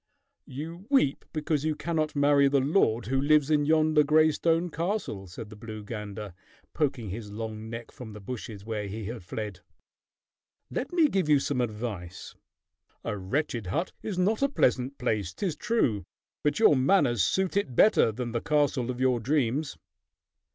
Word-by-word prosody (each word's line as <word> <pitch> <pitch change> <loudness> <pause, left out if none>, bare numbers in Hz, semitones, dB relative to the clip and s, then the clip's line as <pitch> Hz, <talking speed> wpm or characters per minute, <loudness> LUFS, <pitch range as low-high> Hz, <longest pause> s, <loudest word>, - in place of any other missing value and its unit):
"You 165 +8 -7
weep 265 - +2
because 150 -1 -1
you 155 -1 0
cannot 155 -1 -2
marry 145 0 +4
the 140 0 +3
lord 130 - +2
who 135 +3 0
lives 150 0 +3
in 145 -1 +3
yonder 155 -1 +4
gray 155 +2 +4
stone 165 +2 +1
castle," 165 - -3
said 105 +5 -9
the - - -9
blue 110 -1 -8
gander, 105 -2 -6 0.4
poking 130 -8 -1
his 105 +1 -6
long 110 0 -6
neck 115 0 -7
from 115 -4 -10
the 105 - -9
bushes 105 -2 -7
where 110 -2 -3
he 105 +2 -6
had 115 -1 -6
fled. 105 +1 -5 1.1
"Let - - -3
me 335 -3 +4
give 190 - 0
you 145 -2 +6
some 135 -2 -1
advice. 105 -6 -5 0.7
A - - -2
wretched 115 +2 -2
hut 165 - -1
is 205 -4 -4
not 205 +6 +1
a 275 - +3
pleasant 130 - +1
place, 105 -7 -1
'tis 185 -7 -2
true, 120 - 0 0.4
but 150 - +1
your 215 -9 +6
manners 130 - +3
suit 190 - 0
it 200 -12 0
better 205 - +5
than 120 +2 -4
the 115 0 -2
castle 145 -5 +1
of 125 -1 -3
your 130 -2 +2
dreams." 135 +3 0
130 Hz, 170 wpm, -28 LUFS, 110-155 Hz, 1.1 s, you